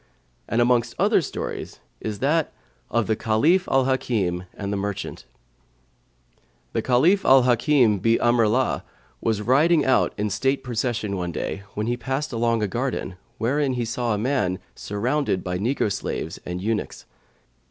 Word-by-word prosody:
And 115 - +2
amongst 120 -1 +2
other 205 +1 +3
stories 145 - -5 0.2
is 110 -2 -4
that 155 +3 +1 0.4
of 115 -1 +1
THE 110 - +1
CALIPH 150 - +2
AL 135 -1 +3
HAKIM[FN#123] 100 -9 -1
AND 100 -1 -4
THE - - -1
MERCHANT 100 0 -4 1.5
The - - 0
Caliph 160 +11 +3
Al 135 -1 +6
Hαkim 120 -3 +3
bi 115 +4 +3
Amri'llah 120 +1 +2 0.4
was 110 -2 0
riding 150 +6 +4
out 130 - +3
in 105 0 -1
state 135 +6 0
procession 115 -4 -2
one 90 -1 -3
day, 100 - -4
when 105 - -1
he 120 +1 -1
passed 135 +4 -3
along 115 -1 +1
a - - +1
garden, 120 -4 -3 0.2
wherein 135 +3 0
he 120 -2 -1
saw 115 0 -1
a - - -2
man, 105 -6 0 0.2
surrounded 115 0 -1
by 90 0 -3
negro 110 0 0
slaves - - -4
and 90 +1 -4
eunuchs. 110 -1 -3
120 Hz, 155 wpm, -24 LUFS, 105-135 Hz, 1.5 s, Al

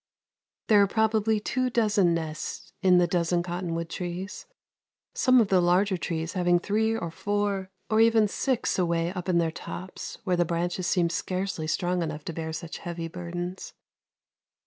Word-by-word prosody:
There 210 -2 +6
are 200 - +5
probably 220 +1 +2
two 255 +4 -1
dozen 210 -7 +3
nests 160 +2 -5
in 185 -3 +5
the 175 - +5
dozen 175 0 +1
cottonwood 170 -1 -3
trees, 180 +3 -5 0.7
some 255 -1 +4
of 220 -4 +3
the 185 -2 +4
larger 185 +3 +3
trees 165 -1 -3
having 175 -1 +3
three 220 +5 0
or 170 -6 -4
four 200 +1 -1 0.2
or 220 0 +3
even 225 -1 +5
six 250 0 0
away 170 0 +1
up 180 -1 -5
in 175 - +3
their 165 -1 +2
tops 180 +3 -7
where 185 - +1
the 175 - +3
branches 175 +2 -2
seem 170 -2 +2
scarcely 185 -3 -2
strong 175 +3 0
enough 155 -2 -4
to 170 - -4
bear 160 0 -4
such 160 +1 -6
heavy 170 -1 -5
burdens. 175 +2 -6
180 Hz, 165 wpm, -27 LUFS, 170-205 Hz, 0.7 s, There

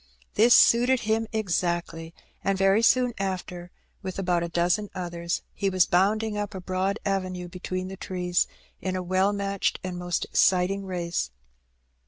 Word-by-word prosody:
This 235 +3 +6
suited 245 +2 +5
him 220 +1 0
exactly, 170 -5 -2 0.3
and 195 0 +1
very 195 +3 +4
soon 245 +1 +3
after, 180 -2 -4 0.3
with 190 -2 -6
about 180 -3 +1
a 170 - -3
dozen 175 +4 +1
others, 170 -1 -3
he 200 - -1
was 185 -2 +3
bonnding 210 +4 +1
up 205 -1 -4
a - - -4
broad 185 +2 -1
avenue 185 -2 -2
between 185 +1 -5
the 190 0 -8
trees, 180 -1 0 0.3
in 185 0 -2
a 185 - -2
well 185 +2 +2
matched 200 -1 -1
and 180 -1 -4
most 175 -1 -2
exciting 190 +2 +2
race. 175 - -2
185 Hz, 155 wpm, -26 LUFS, 180-200 Hz, 0.3 s, This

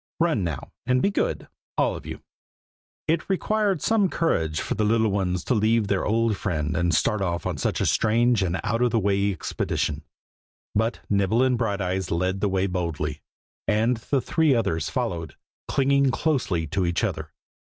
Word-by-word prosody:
Run, 165 - +2
now, 80 -6 -4 0.2
and 130 0 +3
be 200 - +2
good, - - -1 0.3
all - - +2
of - - -9
you!" - - -7 0.8
It 165 +3 0
required 200 -2 +1
some 215 -4 +3
courage 80 - 0
for - - -2
the 110 - 0
little 110 0 +2
ones 90 -3 -1
to - - 0
leave 110 0 +2
their 100 -2 +1
old 115 0 +2
friend 80 -6 -2
and 85 +1 +1
start 100 +6 +1
off 85 -3 -2
on - - -2
such - - 0
a - - +1
strange 115 +1 +3
and 90 -1 0
out 115 +2 0
of 125 - +4
the 115 - +1
way 100 0 +1
expedition; 90 - -2 0.7
but 110 +3 0
Nibble 100 +4 +2
and 130 -1 +3
Brighteyes 100 -5 -1
led 95 +3 -1
the 105 - +2
way 95 0 +1
boldly, 80 -5 -3 0.5
and 115 +3 +2
the 130 +4 -1
three 160 -2 +2
others 80 -10 0
followed, 85 -3 -3 0.3
clinging 140 0 +3
closely 125 - 0
to 95 +5 -1
each 85 -1 0
other. - - -2
105 Hz, 175 wpm, -25 LUFS, 90-125 Hz, 0.8 s, of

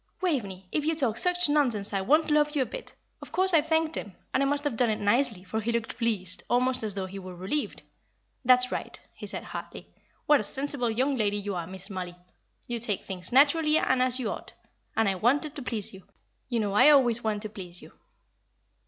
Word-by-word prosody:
'" - - -46
"Waveney, 200 - -2
if 300 - 0
you 320 +2 0
talk 240 -7 +1
such 360 +2 +3
nonsense 245 -9 +2
I 195 - 0
won't 305 +9 +2
love 300 0 +2
you 275 - +3
a - - -5
bit. - - -7 0.3
Of - - -11
course 375 0 +3
I 320 - +6
thanked 320 +1 0
him 200 -3 -6 0.2
and - - +2
I 275 - +2
must 285 +1 0
have 290 -5 -1
done 240 0 +2
it 215 - -1
nicely, 220 -1 +1
for 220 +3 -3
he 230 +2 -1
looked 235 -1 -3
pleased, 205 -7 0
almost 250 +1 +2
as 215 -3 -1
though 195 -1 -2
he 195 +1 -8
were 185 -1 -9
relieved. 195 +12 -3 0.6
'That's 250 0 +5
right,' - - -4
he - - -9
said, - - -4
heartily. - - -9 0.3
'What 295 -1 +5
a - - -2
sensible 270 +1 -2
young 260 +5 0
lady 205 -2 +1
you 205 0 -4
are, 175 -2 -4
Miss 190 +2 -9
Mollie! 180 -2 -5 0.5
You 240 -1 -3
take 215 -4 0
things 185 -2 -3
naturally 305 +4 +4
and 260 -4 +2
as 255 0 +3
you 230 -5 -2
ought - - -8 0.4
and 225 -1 +3
I 195 - +2
wanted 270 +10 +1
to 290 - -6
please 225 -6 -3
you. 190 - -11 0.5
You 235 -3 0
know 205 -2 -2
I 210 - +7
always 245 -5 +5
want 215 -1 -1
to 215 - -5
please 180 -4 -8
you.'" - - -13
235 Hz, 225 wpm, -27 LUFS, 200-285 Hz, 0.6 s, I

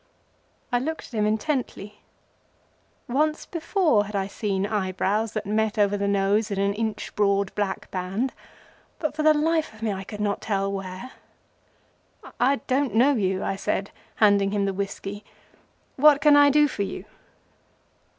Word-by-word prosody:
I 245 - +2
looked 320 +5 -4
at - - -23
him 210 -2 +1
intently. 215 -3 -3 1.1
Once 305 +5 0
before 325 - +1
had 210 0 -7
I 195 -1 0
seen 200 -1 -2
eyebrows 205 +1 -1
that 215 -1 -3
met 215 +1 0
over 205 -1 +3
the 200 0 -1
nose 200 +2 +1
in 200 - -3
an 200 0 +1
inch 220 0 -4
broad 200 -1 +1
black 200 -2 -3
band, 195 +8 -2 0.6
but 310 -2 -3
for 310 - -1
the 310 0 +5
life 315 -4 0
of 220 - -11
me 215 -2 0
I 190 0 -5
could 210 +2 -9
not 205 -1 -1
tell 195 -2 -1
where. 195 +5 -6 1.3
"I 265 +3 +4
don't 260 -4 0
know 260 +6 +5
you," 190 -5 0
I - - -1
said, 195 0 -2 0.2
handing 200 -2 +4
him 200 0 0
the 195 - -1
whiskey. 200 +1 -5 0.7
"What 290 +1 +6
can 295 0 +6
I 290 0 +7
do 295 +1 +4
for 235 - -5
you?" 195 -1 -4
210 Hz, 160 wpm, -25 LUFS, 200-260 Hz, 1.3 s, I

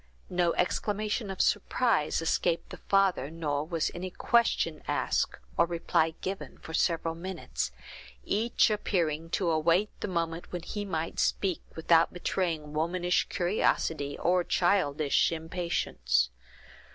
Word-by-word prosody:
No 175 -1 +2
exclamation 210 +3 -1
of 190 - -1
surprise 205 -6 +1
escaped 170 +1 0
the - - -7
father, 195 -8 +3
nor 150 -3 -2
was 165 -2 -1
any 185 +1 -4
question 235 +5 +1
asked, - - 0 0.2
or 170 - +4
reply 165 -1 +1
given, 190 +1 -5
for 160 - -10
several 165 -1 +1
minutes; 165 - -4 0.5
each 225 +1 +2
appearing 165 -6 -1
to 175 -4 +1
await 170 +6 +2
the - - -3
moment 170 -2 -3
when 175 -2 -4
he 205 +3 -4
might 165 -4 -3
speak, 190 -4 +1
without 165 0 +4
betraying 170 -4 -2
womanish 175 +3 +1
curiosity 165 -6 0
or 180 0 +2
childish 160 -7 +2
impatience. 160 - 0
170 Hz, 125 wpm, -29 LUFS, 160-190 Hz, 0.5 s, or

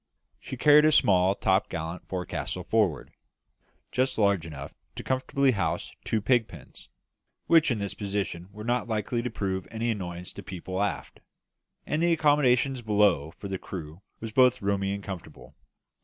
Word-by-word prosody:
She 130 - -7
carried 150 +3 +6
a 155 - +5
small 95 -9 +4
topgallant 90 -3 -1
forecastle 90 0 -4
forward, 95 - 0 0.8
just 130 +1 0
large 100 -6 +2
enough 70 -3 -8 0.2
to - - -6
comfortably 130 +1 +1
house 100 -7 -2
two 110 - -1
pig 120 0 +2
pens, 80 -9 -14 0.6
which 165 -2 +5
in 120 - 0
this 100 -1 -3
position 100 -3 -4
were 105 +1 -9
not 120 +2 0
likely 110 +1 -1
to 125 - -3
prove 95 -4 -3
an 115 0 -5
annoyance 90 -6 -3
to - - -8
people 95 0 -5
aft; 100 -8 -3 0.7
and 150 - -1
the 170 0 +3
accommodation 145 -4 +3
below 105 -9 +2
for 100 - -7
the 95 -1 -4
crew 80 -1 -8 0.2
was 115 -1 -6
both 125 +1 +4
roomy 100 0 0
and 100 0 -4
comfortable. 95 -4 -9
100 Hz, 155 wpm, -27 LUFS, 95-125 Hz, 0.8 s, carried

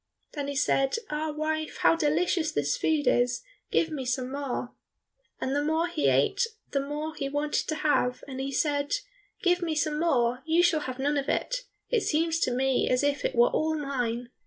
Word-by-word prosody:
Then 285 -2 -3
he 285 - -3
said, 270 -1 +2 0.2
"Ah, 305 +1 -1
wife, 310 +1 -2
how - - +5
delicious 325 +1 +1
this 145 0 0
food 310 -2 +1
is, 245 0 +2 0.3
give 325 - +1
me 285 -4 -3
some 255 0 -2
more." 270 -3 -3 0.7
And 265 - -1
the 290 - +1
more 320 +3 +1
he 140 - 0
ate 135 - +3 0.2
the 280 - +1
more 295 +3 -4
he 275 -2 -3
wanted 290 +1 -1
to 310 - -1
have, 290 -5 +1
and 265 -1 -6
he 270 +1 -2
said, 285 - +1 0.5
"Give 355 0 +3
me 330 -2 -1
some 300 0 0
more, 250 -6 +2
you 325 +2 +3
shall 345 -3 +4
have 255 -4 -5
none 285 +2 +1
of 275 - -4
it. - - -1 0.3
It 470 -3 +3
seems 330 0 +1
to 255 - +1
me 265 +1 +1
as 250 +2 +2
if 285 -1 +1
it - - -1
were 235 0 +5
all 315 0 +1
mine." 245 -4 -2
290 Hz, 200 wpm, -28 LUFS, 260-315 Hz, 0.7 s, how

